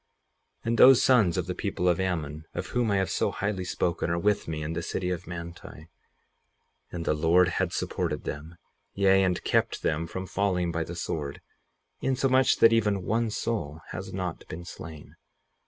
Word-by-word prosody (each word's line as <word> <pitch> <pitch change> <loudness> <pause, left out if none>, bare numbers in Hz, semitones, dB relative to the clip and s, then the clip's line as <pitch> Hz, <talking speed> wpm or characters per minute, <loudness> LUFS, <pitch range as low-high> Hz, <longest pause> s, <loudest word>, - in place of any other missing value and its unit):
58:39 - - -8
And 115 0 +1
those 130 -1 +8
sons 110 -10 +4
of 90 - 0
the 90 - -3
people 95 -2 -2
of 90 0 +3
Ammon, 80 -5 -2
of - - -3
whom 120 -2 0
I 100 - +2
have 95 -3 0
so - - +1
highly 100 -2 -2
spoken, 85 -1 -1
are 85 - 0
with 105 +4 +1
me 80 -1 -3
in 80 +2 -3
the 85 - -2
city 90 +2 -2
of 90 -1 -4
Manti; 85 -2 -9 1.0
and 85 -2 -5
the - - +2
Lord 85 +4 +4
had - - -1
supported - - -2
them, 80 +4 -6 0.4
yea, 95 -1 +4
and 90 -2 0
kept - - 0
them 80 +2 0
from 95 +3 -5
falling 90 -3 0
by 85 0 -1
the 85 +2 -7
sword, 75 -4 -4 0.6
insomuch 130 0 +3
that 115 - +6
even 105 -4 +1
one 115 +3 0
soul 85 -9 -3
has 95 +1 -6
not 90 -3 -5
been 85 +2 -7
slain. 80 -3 -10
90 Hz, 185 wpm, -27 LUFS, 85-100 Hz, 1.0 s, those